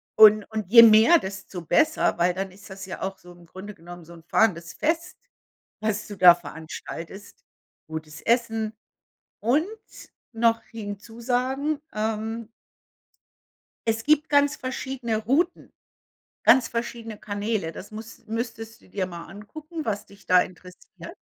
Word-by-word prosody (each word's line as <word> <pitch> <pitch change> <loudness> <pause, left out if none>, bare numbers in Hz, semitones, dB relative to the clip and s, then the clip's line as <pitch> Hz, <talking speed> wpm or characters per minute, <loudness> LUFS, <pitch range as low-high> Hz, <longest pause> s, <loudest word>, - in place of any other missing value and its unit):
Und 215 -1 +8
und 215 -4 -3
je 230 +1 +10
mehr, 225 +9 +7
desto 190 -2 -7
besser, 310 - +2
weil 175 +1 +2
dann 195 +1 -4
ist 195 +1 -15
das 190 0 -8
ja 185 - -7
auch 195 0 -3
so 180 -1 -15
im 175 -1 -18
Grunde 190 +5 -10
genommen 175 0 -12
so 170 - -13
'n 165 -1 -14
fahrendes 170 -4 +1
Fest, 335 +3 -1 0.6
was 215 -1 -2
du 205 - -7
da 180 -1 +9
veranstaltest. 165 +4 -9 0.4
Gutes 155 -1 -7
Essen. 225 -2 0 0.7
Und 275 - +2 0.7
noch 230 0 +2
hinzusagen, 245 +7 -3
ähm 220 +1 -3 1.4
es 225 0 0
gibt 305 +1 +3
ganz 285 0 +3
verschiedene 255 -3 -3
Routen, 330 - 0 0.7
ganz 255 -3 +6
verschiedene 230 -2 -5
Kanäle. 205 -4 -3
Das 200 - -10
muss 220 +1 -10
müsstest 225 0 -5
du - - -21
dir 190 -2 -2
mal 170 -2 -8
angucken, 305 - -9
was 205 -2 -2
dich 200 0 -19
da 180 0 +5
interessiert. 180 0 -10
215 Hz, 140 wpm, -25 LUFS, 190-235 Hz, 1.4 s, je